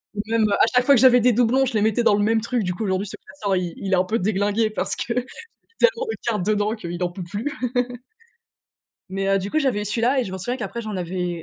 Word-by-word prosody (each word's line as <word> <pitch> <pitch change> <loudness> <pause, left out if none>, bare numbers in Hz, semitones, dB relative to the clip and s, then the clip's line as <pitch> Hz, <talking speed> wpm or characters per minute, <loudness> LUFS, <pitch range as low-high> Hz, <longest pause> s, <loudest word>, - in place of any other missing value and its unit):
Et 205 - -1
même, 230 -1 +3
heu, - - +1
à - - +4
chaque 250 0 +4
fois 280 - +6
que 235 - +3
j'avais 250 -1 +7
des 245 +1 +3
doublons, 245 +3 +3
je 250 - -3
les 210 - +2
mettais 220 +2 +2
dans 205 - +4
le 205 - +1
même 220 +1 +2
truc. 235 -1 -1
Du 180 -1 -2
coup, 220 - -5
aujourd'hui, 190 0 -1
ce - - -6
classeur, 195 0 -3
il 180 -2 -2
il 195 -1 -3
est - - +6
un 180 - +3
peu 220 +5 -1
déglingué 205 +3 +1
parce - - +1
que 235 - -3 0.7
tellement 480 0 +3
de - - -4
cartes 210 -6 0
dedans 210 +1 +1
qu'il 175 -3 -5
en 175 - 0
peut 180 0 -7
plus 205 +11 -4 1.6
mais 195 +1 -3
heu, 195 0 +3
du 195 +2 -5
coup, 310 - +2
j'avais 255 -8 0
eu - - -4
celui-là 235 +6 +1
et - - +1
je 185 - -7
m'en 190 - -5
souviens 245 +7 -3
qu'après 235 +1 -5
j'en 215 -3 -5
avais 180 0 -3
210 Hz, 275 wpm, -22 LUFS, 190-235 Hz, 1.6 s, j'avais